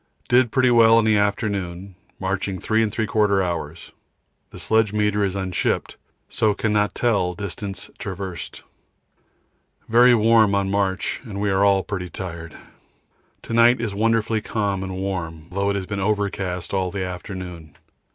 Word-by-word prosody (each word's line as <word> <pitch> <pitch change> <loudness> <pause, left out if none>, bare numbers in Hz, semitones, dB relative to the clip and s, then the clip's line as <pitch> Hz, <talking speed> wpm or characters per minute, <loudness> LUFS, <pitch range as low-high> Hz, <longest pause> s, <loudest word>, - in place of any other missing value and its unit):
Did 125 -1 +3
pretty 130 -2 +3
well 115 -1 +6
in 115 - +3
the 110 -1 +3
afternoon, 100 -3 -2 0.3
marching 95 0 -2
3 110 +4 +1
3/4 105 -2 +1
hours; 85 -2 -5 0.6
the - - -12
sledge 110 -2 +1
meter 105 -1 +1
is 100 -1 -1
unshipped, 95 -2 -1 0.3
so 105 -2 +1
cannot 105 -1 0
tell 100 -7 +1
distance 100 0 -5
traversed. 95 -4 -6 1.2
Very 120 +2 +6
warm 110 -2 +4
on 100 -1 0
march 100 -2 -1
and 105 -6 -7
we 105 -1 0
are 95 +1 +2
all 100 -1 +3
pretty 95 -3 -5
tired. 85 -3 -7 0.9
To - - -6
night 115 +1 +5
it - - -4
is 110 -4 -2
wonderfully 115 +1 +1
calm 100 -3 -2
and 95 -1 -5
warm, 85 -5 -4
though 100 +2 0
it 100 - 0
has 95 -2 -3
been 100 +1 -4
overcast 100 -3 -2
all 95 -1 0
the 95 0 -3
afternoon. 90 -4 -8
100 Hz, 150 wpm, -22 LUFS, 95-110 Hz, 1.2 s, well